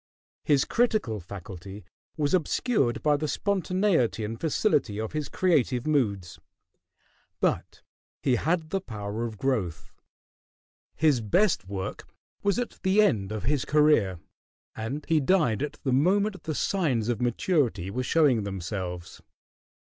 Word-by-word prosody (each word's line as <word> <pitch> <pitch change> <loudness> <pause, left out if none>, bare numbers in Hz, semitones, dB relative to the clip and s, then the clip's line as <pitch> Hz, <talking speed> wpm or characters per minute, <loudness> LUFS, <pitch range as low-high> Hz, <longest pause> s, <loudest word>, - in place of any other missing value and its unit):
His 140 -3 +3
critical 215 - +1
faculty 95 +1 -9 0.3
was 145 0 0
obscured 175 - +1
by 150 -1 +3
the 155 +1 -2
spontaneity 185 - +1
and 115 +2 -6
facility 145 - +1
of 110 0 -3
his 150 -1 -3
creative 140 -9 +1
moods; 105 - 0 1.0
but - - -1 0.4
he 130 - +3
had 160 +3 -1
the 195 - 0
power 110 - -4
of 110 -2 -6
growth. 100 -10 -2 1.0
His 145 -6 +3
best 135 - +2
work 95 -1 -5 0.3
was 200 +1 +1
at 245 -1 -4
the 190 +2 +2
end 110 - +3
of 110 -1 -4
his 140 +2 +1
career, 145 - +3 0.6
and 130 +7 -4
he 160 -1 +3
died 145 - +2
at 150 - -3
the 130 - 0
moment 190 +8 +2
the 155 - -2
signs 140 - 0
of 120 -2 -1
maturity 120 - 0
were 125 - -2
showing 135 -4 +3
themselves. 95 -3 -5
130 Hz, 130 wpm, -27 LUFS, 105-165 Hz, 1.0 s, His